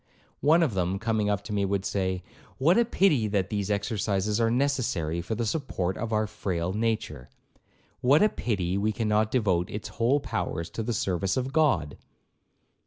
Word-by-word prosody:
One 160 +4 +4
of 140 -9 0
them, 95 0 0
coming 110 -1 0
up 100 -1 -1
to 105 - -6
me, 100 -1 +1
would 100 0 -1
say, 95 -2 -1 0.3
'What 160 +7 +4
a 235 - +4
pity 165 - +2
that 100 -2 -1
these 100 -1 -2
exercises 105 0 0
are 115 - +3
necessary 115 - 0
for 110 +6 -3
the 115 +1 -1
support 105 - -2
of 115 0 -4
our 110 0 +2
frail 90 -4 -3
nature! 110 - -2 0.7
what 135 +7 +4
a 215 - +5
pity 100 - -1
we 105 +2 +1
cannot 110 -1 +1
devote 95 -8 +1
its 105 - -6
whole 125 +5 +1
powers 85 - -3
to 110 - -4
the 120 +2 -2
service 95 -1 -1
of 130 +1 -2
God!' 120 - +1
105 Hz, 175 wpm, -27 LUFS, 95-120 Hz, 0.7 s, a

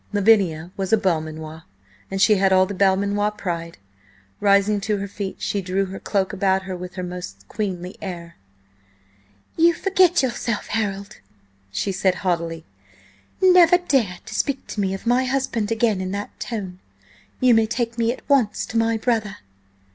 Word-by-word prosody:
Lavinia 190 -6 +3
was 190 -1 -3
a 220 - +6
Belmanoir, 160 -4 -2 0.5
and 195 - -3
she 200 +3 +5
had 190 0 +3
all 185 0 +5
the 200 - -5
Belmanoir 200 +2 +2
pride. 170 -5 -5 0.6
Rising 200 0 +3
to 210 +1 -1
her 200 0 -4
feet 195 -1 -6
she 200 - -2
drew 190 +1 -1
her 190 0 -7
cloak 195 -1 -1
about 190 -1 +1
her 190 -1 -5
with 180 0 -8
her 185 - -4
most 175 - -8
queenly 185 - -4
air. 170 -3 -7 1.2
"You 335 +1 +5
forget 370 -4 +3
yourself, 235 -3 -2
Harold," 200 -2 -3 0.5
she 145 - -1
said 190 0 +1
haughtily. 165 -2 -1 0.8
"Never 360 -2 +7
dare 265 - 0
to 220 - -9
speak 270 +4 -1
to 210 - -3
me 195 -1 0
of 195 - -10
my 245 +2 +2
husband 250 -5 -1
again 220 -4 +1
in 185 - -3
that 205 +1 -6
tone! 190 -6 -5 0.6
You 255 -1 +5
may 225 -1 +4
take 235 +1 -2
me 230 0 +2
at 250 - -9
once 255 -7 +2
to 230 - -4
my 225 0 +1
brother." 220 -3 -1
200 Hz, 165 wpm, -22 LUFS, 185-225 Hz, 1.2 s, Never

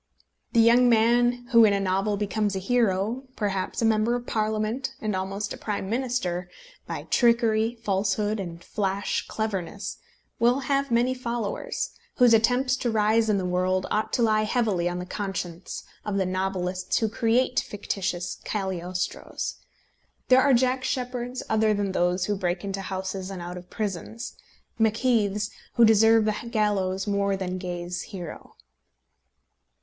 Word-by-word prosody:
The 235 - +4
young 240 +2 +6
man 240 +2 +3
who 230 -1 +8
in 210 -2 +5
a 200 - +1
novel 195 +2 0
becomes 205 0 -1
a - - -1
hero, 225 +3 +1
perhaps 195 +1 -2
a - - +4
Member 225 +2 +3
of 245 0 -4
Parliament, 220 +5 -1
and 215 -2 -2
almost 195 +2 -3
a - - -8
Prime 205 -2 -3
Minister, 230 -8 -1 0.4
by - - -4
trickery, 230 -1 +3
falsehood, 205 +1 0
and 170 -3 -6
flash 195 -2 -2
cleverness, 200 -3 -3 0.4
will 240 +4 +3
have 275 0 0
many 240 +2 +2
followers, 235 -4 -3 0.2
whose 245 -2 +6
attempts 250 +4 +3
to 245 - -1
rise 220 0 +2
in 210 - +3
the 190 - -1
world 185 +1 +1
ought 215 - 0
to 240 - +2
lie 215 -1 +3
heavily 210 -6 +1
on 175 - -3
the 180 - -4
conscience 185 -3 -5 0.2
of 205 -2 -2
the 190 - +1
novelists 185 0 -1
who 225 - +2
create 240 +4 +2
fictitious 190 -3 -3
Cagliostros. 185 -3 -3 0.7
There 255 0 +7
are 270 -1 +5
Jack 255 +1 +1
Sheppards 250 -1 -3
other 220 -1 +2
than 200 -1 -1
those 180 0 +1
who 205 - 0
break 180 -2 -2
into 195 -1 -3
houses 190 0 -4
and 195 -2 -6
out 175 +1 -6
of 180 0 -10
prisons, 215 +3 -4 0.4
Macheaths, 220 -2 +2 0.2
who 235 - +7
deserve 225 0 +5
the 215 - +2 0.2
gallows 195 -4 0
more 200 -1 +1
than 185 -1 -3
Gay's 175 -1 -4
hero. 180 -6 -8
210 Hz, 150 wpm, -26 LUFS, 190-235 Hz, 0.7 s, who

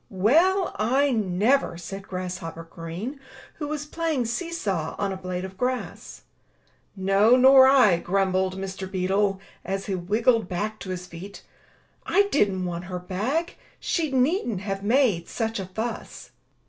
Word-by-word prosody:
"Well, 330 - +3
I 265 +6 +2
never!*' 215 +1 +1
said 195 +3 -8
Grasshopper 180 -3 -5
Green, 170 - -7 0.4
who 295 - -3
was 295 -1 -4
playing 315 -4 -1
see 335 +10 -3
saw 190 - -2
on 200 - -1
a - - -3
blade 185 0 -4
of 190 0 -11
grass. 255 0 -4 0.7
"No, 195 +4 +4
nor 260 +1 +8
I, 255 -10 +6
grumbled 190 0 0
Mr. 190 0 -5
Beetle, 195 +1 +1 0.2
as 195 +1 -3
he 200 - -3
wriggled 215 +4 +1
back 210 +4 -3
to 190 - -8
his 180 -1 -4
feet. 185 +3 -10 0.6
"I 400 - +3
didn't 195 -9 +1
want 175 0 -4
her 180 0 -5
bag. 215 - -2 0.2
She 325 -3 -1
needn't 255 - +1
have 195 -1 -3
made 220 -6 +2
such 225 -2 -2
a 190 - -5
fuss." 220 +5 -6
200 Hz, 145 wpm, -25 LUFS, 185-255 Hz, 0.7 s, nor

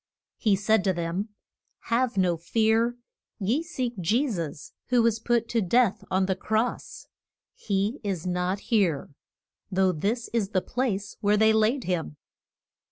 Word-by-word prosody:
He 210 -4 +3
said 205 +1 +2
to 190 - +3
them, 175 +5 -3 0.5
Have 240 -1 0
no 180 -2 +3
fear. 220 +7 +1 0.4
Ye 225 +9 0
seek 255 - -4
Je 230 - +2
sus, 165 - -5
who 245 -2 +3
was 225 -1 +2
put 235 0 +1
to 230 - +1
death 215 +1 +2
on 190 0 +2
the 190 0 0
cross. 220 +5 -2 0.5
He 205 +5 -1
is 190 -5 -3
not 180 +2 -1
here, 175 -12 +2 0.6
though 190 0 +3
this 210 +9 -2
is 220 -5 0
the 195 - +1
place 210 -5 -2
where 210 0 +3
they 220 +1 +5
laid 220 +4 +2
him. 165 -4 -2
210 Hz, 150 wpm, -26 LUFS, 185-230 Hz, 0.6 s, they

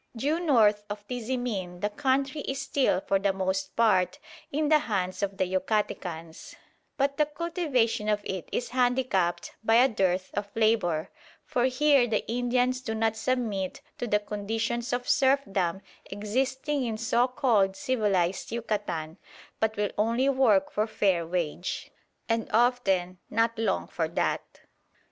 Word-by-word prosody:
Due 290 +8 0
north 220 -11 +4
of 205 0 -7
Tizimin 235 -7 -3
the 205 0 0
country 275 +4 0
is 270 -1 -3
still 255 -9 +1
for 195 0 +1
the 195 0 +2
most 190 0 -2
part 215 0 +3 0.3
in 300 +2 0
the 305 0 +5
hands 195 -10 -2
of 200 -1 -2
the - - +2
Yucatecans; 180 -4 -3 0.4
but 280 0 +1
the 300 -1 +3
cultivation 295 - 0
of 210 -1 +2
it 190 -4 -5
is 245 - -2
handicapped 245 -8 +1
by 225 0 +3
a 250 +3 +7
dearth 190 -6 0
of 205 0 -3
labour, 215 -8 +1 0.3
for 245 0 +1
here 260 0 +4
the 220 -2 -1
Indians 245 +1 +1
do 225 -3 -3
not 220 0 +1
submit 220 -6 -2 0.2
to 245 - -2
the 210 - +3
conditions 225 +3 -3
of 245 0 -2
serfdom 200 -10 +2 0.2
existing 260 +7 -1
in 225 -3 -2
so 235 +2 +2
called 220 -7 +2
civilised 195 -7 0
Yucatan, 205 -8 -3 0.4
but 220 -1 0
will 205 -1 0
only 230 +5 +2
work 235 -8 +3
for 215 +1 0
fair 195 -6 +1
wage, 175 0 -3 0.4
and 230 -1 -1
often 195 -7 +2
not 230 +1 +1
long 210 - 0
for - - -2
that. - - -2
220 Hz, 145 wpm, -28 LUFS, 195-255 Hz, 0.4 s, a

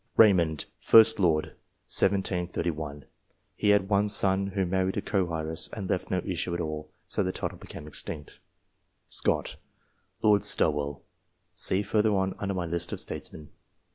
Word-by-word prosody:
Raymond, 85 -8 +4 0.2
1st 110 -1 +6
Lord 80 -5 +2 0.4
(1731). 85 -6 0 0.5
He 105 - 0
had 105 -2 +4
one 100 +1 +2
son, 100 -1 +2
who 95 -1 -1
married 95 +1 -1
a - - 0
co 95 -4 -1
heiress, 80 0 -1
and 100 -4 -5
left 90 - -2
no 90 -1 -1
issue 85 -1 -2
at - - -3
all, 75 -2 -4 0.2
so - - -1
the 95 -1 0
title - - -5
became - - -10
extinct. 75 0 -5 0.7
Scott, - - 0 0.7
Lord 105 -2 +4
Stowell. 70 -2 +1 0.5
See 95 +2 0
further 105 0 +1
on, 95 0 0
under 100 -1 -2
my 90 -2 -2
list 85 0 -3
of - - -4
STATESMEN. 75 -2 -6
95 Hz, 150 wpm, -27 LUFS, 80-100 Hz, 0.7 s, 1st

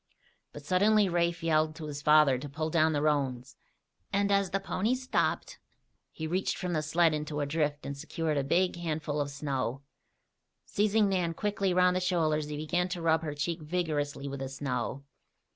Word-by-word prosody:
But 145 -1 -11
suddenly 205 +4 +4
Rafe 170 -1 0
yelled 155 -1 +2
to 160 - -7
his 145 -1 -6
father 150 -3 +5
to 145 +2 -7
pull 155 +3 -3
down 160 -1 +3
the 145 -1 0
roans, 135 -4 0 0.6
and 200 +1 +1
as 200 -1 +2
the 195 +3 0
ponies 220 +6 -1
stopped, 255 - -1 0.5
he 160 - -6
reached 180 +4 -1
from 180 -1 -3
the 155 - +1
sled 160 +2 +3
into 150 0 -3
a 145 - 0
drift 150 0 -1
and 140 - -4
secured 155 +2 -2
a 140 - +1
big 180 +6 +1
handful 155 -3 -2
of 145 - -2
snow. 140 -2 -3 0.8
Seizing 210 +1 +2
Nan 180 -4 0
quickly 200 -1 0
around 180 0 +4
the 185 - +1
shoulders 160 -5 +1
he 150 0 -5
began 175 +4 -1
to 180 -1 -3
rub 165 -1 +2
her 150 -2 -4
cheek 165 +3 -2
vigorously 150 -4 -2
with 140 0 -5
the 135 0 -4
snow. 135 -1 -3
155 Hz, 185 wpm, -30 LUFS, 145-180 Hz, 0.8 s, father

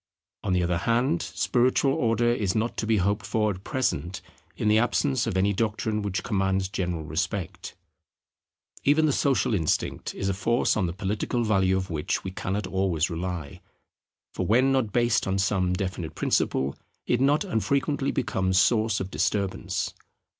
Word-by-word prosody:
On 95 - 0
the 90 -1 +2
other 85 -1 0
hand, 125 - +1
spiritual 130 +2 +1
order 120 0 +2
is 100 -6 -1
not 110 +2 0
to 110 - -2
be 110 -1 +3
hoped 100 +2 0
for 105 +1 0
at 95 0 -8
present 115 -9 -1 0.4
in - - -1
the 105 +1 +5
absence 125 +2 +1
of 95 - -1
any 100 +2 +2
doctrine 110 0 -1
which 100 -2 -2
commands 95 -2 0
general 90 -5 -2
respect. 90 +4 -4 1.1
Even 150 +3 +4
the 150 - +3
social 130 -6 +1
instinct 80 -7 -1
is 95 - -2
a 100 - +1
force 115 +6 +1
on 95 -4 +1
the 85 - -4
political 100 +5 -2
value 95 -4 +2
of 95 -1 -4
which 75 -2 -2
we 95 - -4
cannot 95 +2 -3
always 95 -4 0
rely: 85 -3 -5 0.7
for - - -2
when 125 +5 +4
not 130 -6 +1
based 120 0 +2
on 95 0 0
some 95 -1 +1
definite 90 -4 -3
principle, 65 +1 0 0.3
it 120 - +1
not 145 +5 +3
unfrequently 140 - 0
becomes 95 0 0
source 110 0 +2
of 95 0 -5
disturbance. 95 -2 -1
100 Hz, 165 wpm, -26 LUFS, 95-120 Hz, 1.1 s, the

